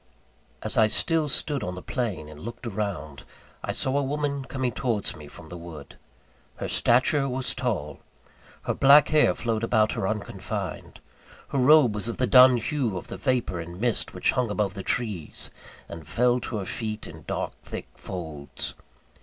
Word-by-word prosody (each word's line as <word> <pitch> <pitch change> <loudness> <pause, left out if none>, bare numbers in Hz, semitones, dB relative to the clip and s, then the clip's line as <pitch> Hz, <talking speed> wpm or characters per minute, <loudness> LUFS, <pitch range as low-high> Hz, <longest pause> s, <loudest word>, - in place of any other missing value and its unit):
As - - 0
I 110 - +6
still 160 +7 +2
stood 145 -2 0
on 90 -2 -3
the 90 - -8
plain 110 - -3
and 75 -1 -11
looked 115 +7 -8
around, 100 -10 -4 0.4
I - - -1
saw 130 +2 +1
a - - 0
woman 140 0 -2
coming 130 -2 -2
towards 115 -3 -1
me 75 -3 -11
from 80 +2 -13
the 90 - -7
wood. 80 -4 -10 0.6
Her - - -4
stature 135 +3 +3
was 130 0 -1
tall; 95 - -2 0.6
her - - 0
black 140 +2 +7
hair 155 -1 +4
flowed 115 -2 -1
about 110 -1 +3
her 95 - -1
unconfined; 105 -1 -5 0.5
her 140 - 0
robe 135 -3 +6
was 105 +1 -2
of 115 - -3
the 130 - +2
dun 125 0 +8
hue 120 -4 -1
of - - -8
the - - -5
vapour 125 -9 0
and 85 +2 -7
mist 120 -1 0
which - - +2
hung 125 -3 0
above 105 -2 0
the 100 - -6
trees, 100 -7 -2 0.4
and 80 -3 -9
fell 125 +1 +2
to 115 - -4
her 100 - -3
feet 110 +2 -4
in - - -11
dark - - -2
thick - - -7
folds. 80 -6 -5
115 Hz, 180 wpm, -26 LUFS, 90-130 Hz, 0.6 s, dun